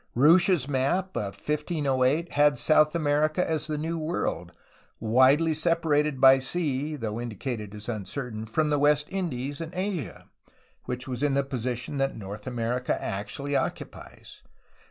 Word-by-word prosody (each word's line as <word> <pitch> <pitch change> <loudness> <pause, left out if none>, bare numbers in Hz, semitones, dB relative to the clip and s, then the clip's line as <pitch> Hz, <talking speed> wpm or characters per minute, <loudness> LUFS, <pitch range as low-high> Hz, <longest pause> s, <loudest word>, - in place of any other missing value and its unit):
Ruysch's 160 +2 +4
map 145 +8 0
of 100 -2 -3
1508 150 0 0
had 145 0 +3
South 155 0 +4
America 155 +2 +1
as 160 -1 -2
the 155 -1 -2
New 165 +2 -3
World, 160 +3 -3 0.5
widely 130 +8 +4
separated 155 -3 +1
by 135 0 +7
sea 150 0 -1
(though 115 -4 -4
indicated 110 -2 -5
as 105 +1 -9
uncertain) 110 0 -5
from 150 +7 0
the 145 - +2
West 150 0 +3
Indies 145 -7 -3
and 165 +2 -7
Asia, 185 - -4 0.6
which 125 +1 -4
was 125 -1 -4
in 145 -2 +1
the 140 - +2
position 125 0 -4
that 135 0 0
North 105 +3 -8
America 125 0 -1
actually 140 +8 -4
occupies. - - -5
140 Hz, 140 wpm, -27 LUFS, 125-155 Hz, 0.6 s, by